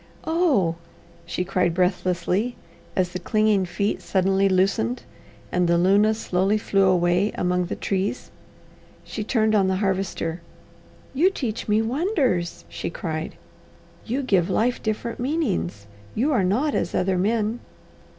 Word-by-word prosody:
"Oh!" 290 - +2 0.5
she 180 - -2
cried 180 -3 +1
breathlessly, 185 +4 0 0.4
as 185 -1 +1
the 180 0 -5
clinging 215 +1 +2
feet 180 +4 -2
suddenly 195 +1 +2
loosened 185 - +1 0.5
and 180 -1 +2
the 170 0 +3
luna 200 +5 +4
slowly 195 0 +1
flew 195 -2 +2
away 180 +2 +3
among 180 0 0
the - - -3
trees. 195 +5 -2 0.7
She 215 - -5
turned 220 -1 +1
on 200 -3 +4
the 190 - +1
Harvester. 190 -3 -2 0.7
"You 320 +8 +4
teach 240 - -4
me 215 +1 +3
wonders!" 255 - 0
she - - -5
cried. 160 -2 -4 0.7
"You 260 +5 -2
give 190 -7 +2
life 240 +5 +1
different 220 +2 -3
meanings. 220 - -1 0.3
You 270 +7 +1
are 220 -7 +2
not 250 +11 +1
as 170 - -1
other 185 0 +1
men." 220 +3 0
195 Hz, 135 wpm, -24 LUFS, 180-225 Hz, 0.7 s, luna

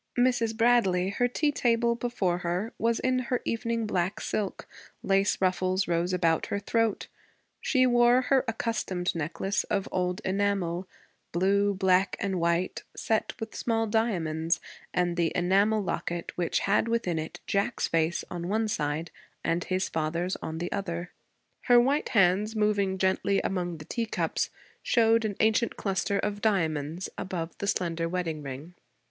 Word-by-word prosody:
Mrs. 245 -3 +2
Bradley, 220 -6 +3
her 245 +5 +1
tea 295 +4 +1
table 235 -3 +2
before 230 -7 -1
her, 180 +6 -2
was 230 0 +1
in 255 0 +1
her 250 0 -1
evening 230 0 -1
black 185 -2 -1
silk; 205 -3 -3 0.4
lace 195 +1 +2
ruffles 185 0 +1
rose 170 +1 0
about 170 -3 +1
her - - -1
throat; 225 +1 0 0.6
she 255 -3 +3
wore 245 +1 +5
her 265 0 +3
accustomed 215 -6 -1
necklace 170 +5 -1
of 195 - -1
old 180 +1 -1
enamel, 190 -2 0 0.4
blue, 200 +3 +2
black, 190 0 +3
and 190 -2 -1
white, 170 +2 0
set 220 -1 -1
with 225 0 -6
small 225 -1 0
diamonds, 170 -8 0 0.3
and 175 -1 0
the 170 -1 +2
enamel 200 +4 +3
locket 175 -2 -3
which 175 -2 0
had 200 +3 +2
within 230 -8 0
it 160 +3 -6
Jack's 200 0 0
face 165 +1 +1
on 175 -1 -4
one 220 +3 +1
side 155 -3 -2 0.3
and 170 +1 0
his 185 0 0
father's 170 +4 -1
on 160 0 -5
the 175 +2 -4
other; 175 -3 -3 0.5
her 245 -1 +7
white 275 +5 +2
hands, 200 +2 +3
moving 205 -3 +1
gently 190 +1 +1
among 175 -3 -2
the 155 - -10
teacups, 230 +3 -1 0.3
showed 230 -2 +3
an 210 -2 -2
ancient 220 +2 +2
cluster 200 0 0
of 205 0 -2
diamonds 165 -5 0
above 170 -3 -4
the 200 - -3
slender 165 -3 0
wedding 165 -4 -2
ring. 140 +5 -7
195 Hz, 150 wpm, -28 LUFS, 175-225 Hz, 0.6 s, her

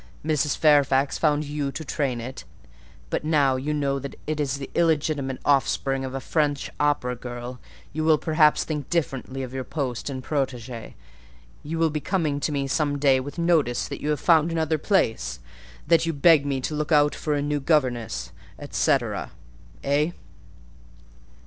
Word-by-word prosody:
Mrs. 150 -2 +1
Fairfax 145 -2 +3
found 150 0 +2
you 145 -1 -3
to 160 - -6
train 135 -3 -1
it; 130 +3 -7 0.7
but - - -1
now 145 -4 +3
you 135 +4 -2
know 140 -2 0
that 140 +1 -7
it 155 0 -2
is 140 -2 0
the 135 -1 -6
illegitimate 150 -5 +1
offspring 135 -1 +1
of 130 0 -5
a - - -2
French 145 0 -1
opera 145 -4 +1
girl, 120 +1 -7 0.3
you 155 +1 -2
will 155 -1 +5
perhaps 155 -1 +3
think 150 -4 -4
differently 135 -5 -2
of 130 0 -7
your 130 -1 -3
post 130 -3 -3
and 130 -2 -5
protégée: 125 -5 -3 0.7
you 160 +3 -4
will 165 -1 +2
be 150 - -2
coming 155 -4 -1
to 150 - -1
me 140 -1 -1
some 145 +1 0
day 135 -2 +4
with 140 +4 -7
notice 165 -8 +2
that - - -7
you 150 - -2
have 150 - +1
found 165 -1 +4
another 160 -1 0
place—that 115 - -1
you 165 - 0
beg 145 0 +5
me 135 -1 0
to 150 - -3
look 150 +1 -2
out 145 -1 +5
for 150 -1 -2
a 145 - 0
new 145 0 0
governess, 120 - 0 0.4
&c.—Eh?" 140 - -1
145 Hz, 165 wpm, -25 LUFS, 130-155 Hz, 0.7 s, will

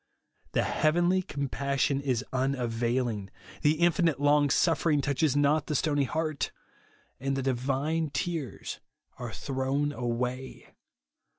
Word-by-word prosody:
The - - +2
heavenly 175 +4 +2
compassion 140 -2 -1
is 130 -2 -1
unavailing; 120 -4 0 0.3
the 150 - +4
infinite 165 -3 +2
long 145 0 +4
suffering 160 -1 +3
touches 145 0 +1
not 145 +1 +3
the 150 - -1
stony 145 -1 +2
heart, 155 +2 -1 0.7
and 135 0 -1
the 135 - -2
divine 135 +5 0
tears 145 0 -3 0.4
are 120 -2 -5
thrown 135 +4 -1
away. 125 0 -4
140 Hz, 110 wpm, -29 LUFS, 130-155 Hz, 0.7 s, the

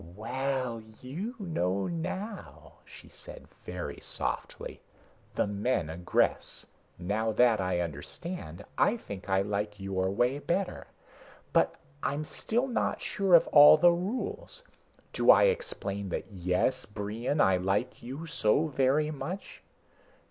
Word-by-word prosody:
"Well, 130 +1 -2 0.2
you 180 - -5
know 100 - -1
now," 190 +5 -6
she - - -14
said - - -11 0.2
very - - -6
softly. - - -5 0.5
"The - - +2
men 100 -4 -1
aggress. 85 +2 0 0.3
Now 105 +5 -1
that 115 -2 +4
I 90 -1 0
understand, 85 - -6
I 235 - +4
think 100 - -9
I 95 0 +3
like 105 0 -3
your 95 -1 -1
way 120 +8 +1
better. 180 +5 -2 0.7
But - - +3 0.3
I'm 145 +2 -1
still 230 - -1
not 250 -3 -1
sure 195 -3 +3
of 165 - +6
all 150 +1 +9
the 175 +3 +6
rules. 255 - -4 0.5
Do - - +1
I - - +9
explain 100 - -1
that 90 - -4
yes, 90 +8 0
Brion, 110 +7 -3
I 95 -8 +5
like 95 +6 -1
you 135 +7 -7
so 150 -2 +2
very 145 +1 +1
much? 180 +6 -6
125 Hz, 125 wpm, -29 LUFS, -, 0.7 s, all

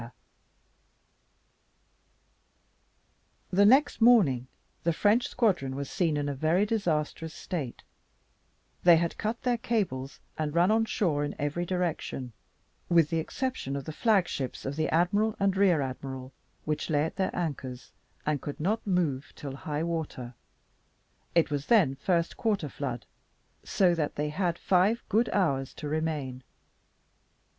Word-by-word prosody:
The 200 +2 +5
next 265 +2 +4
morning 175 - +5 0.4
the 170 - +2
French 215 +8 +3
squadron 185 - 0
was 140 0 -5
seen 165 -5 +1
in 145 0 -1
a 145 - -1
very 160 +8 +2
disastrous 165 -6 -1
state; 145 -10 -5 1.0
they 175 -2 +7
had 170 0 -2
cut 220 +2 -2
their 245 -2 +1
cables, 195 - -2 0.2
and 155 0 -2
run 175 +4 +4
on 225 0 +3
shore 160 -9 0
in 145 - -3
every 150 +5 -2
direction, 165 -8 -2 0.6
with 165 -3 +4
the 165 - +1
exception 250 - -3
of 140 -2 -4
the - - -5
flag 205 -1 +3
ships 130 -2 -4
of 135 - -3
the 155 0 0
admiral 205 +6 +2
and 195 -1 +2
rear 190 -6 +4
admiral, 130 0 -6 0.3
which 155 +1 -2
lay 145 -2 +2
at 160 - -4
their 190 - -1
anchors, 135 -7 -4 0.3
and 150 -2 0
could 145 - -6
not 210 +8 -1
move 160 -8 0
till 140 -2 -7
high 150 +2 -3
water; 160 -7 -4 1.0
it 165 -3 +3
was 145 -1 -2
then 195 - +5
first 170 +4 0
quarter 205 - 0
flood, 125 -4 -5 0.6
so 180 -3 +3
that 155 -3 -2
they 150 +1 -1
had 175 +1 -1
five 195 +7 +2
good 220 +3 +2
hours 140 -9 0
to 150 - -6
remain. 150 -4 -2
165 Hz, 140 wpm, -28 LUFS, 145-195 Hz, 1.0 s, they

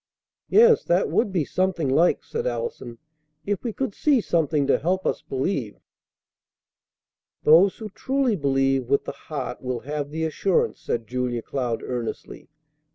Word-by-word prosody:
"Yes, 465 0 +6
that 175 +2 +1
would 215 - +1
be 170 -6 0
something 185 -4 0
like!" 160 +7 +3
said 470 +2 -3
Allison. 465 - -4 0.5
"If 205 -2 -2
we 235 - -2
could 255 -1 -3
see 285 +2 +2
something 155 -7 +1
to 140 - +2
help 185 +4 -1
us - - -1
believe 130 - -3 0.9
" - - -65
"Those 175 +6 +6
who 220 -1 -7
truly 265 0 0
believe 135 -4 +1
with 140 - +2
the - - -3
heart 145 -5 -6
will 125 -2 -3
have 145 0 -4
the 160 +2 -2
assurance," 170 +4 0
said 115 -1 -2
Julia 125 0 -2
Cloud 125 -4 -3
earnestly. 120 -3 -6
155 Hz, 155 wpm, -24 LUFS, 130-200 Hz, 0.9 s, Yes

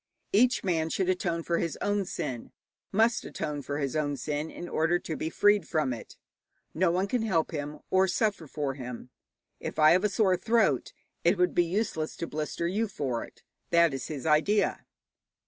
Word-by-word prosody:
Each 245 +5 +4
man 165 -4 0
should 185 +2 0
atone 170 -2 0
for 170 0 0
his 165 - -2
own 205 -1 0
sin, 135 -10 -5 0.4
must 225 +4 +3
atone 150 -1 -4
for 140 +1 -4
his 140 -2 -2
own 145 -2 0
sin, 150 +4 -3
in 175 - -8
order 165 +1 +2
to 165 -3 -5
be 160 - -3
freed 205 +3 +3
from 155 -6 0
it. 115 - -10 0.6
No 175 +2 +2
one 180 +3 +1
can 235 +4 -1
help 185 -8 +1
him, 150 -1 -4
or 190 0 +4
suffer 195 -3 0
for 145 -1 -2
him. 125 -2 -8 0.5
If - - -6
I 155 0 +7
have 180 +3 +4
a 210 - +3
sore 195 -3 +2
throat, 220 - +2 0.3
it 175 +4 +4
would 180 0 +2
be 175 - +3
useless 170 -4 -2
to - - -4
blister 155 +2 -3
you 210 +6 0
for 135 - -3
it: - - -15 0.3
that 170 -3 +4
is 135 - -4
his 150 -3 -6
idea. 160 +7 +2
170 Hz, 190 wpm, -28 LUFS, 150-195 Hz, 0.6 s, I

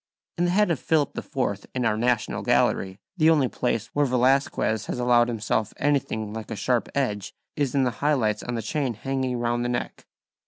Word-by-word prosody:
In 175 - +3
the - - +1
head 205 +1 +3
of 160 - 0
Philip 155 -3 +1
IV 100 -7 -3
in 125 -2 0
our 105 - +2
National 120 0 0
Gallery 95 0 +1 0.2
the 160 -1 +5
only 150 -5 +4
place 115 -2 -2
where 145 -1 +2
Velazquez 125 -4 +1
has - - -3
allowed 120 -1 +4
himself 110 -2 -1
anything 125 -7 0
like 110 -1 -6
a - - -4
sharp 120 +4 0
edge 105 -8 -2 0.2
is 140 -3 -1
in 135 - +3
the 125 - +1
high 150 +1 +3
lights 110 -5 0
on 120 - -4
the 115 - -3
chain 135 -1 -1
hanging 130 +1 -2
round 120 0 0
the 120 - -1
neck. 120 0 -4
125 Hz, 200 wpm, -25 LUFS, 110-140 Hz, 0.2 s, the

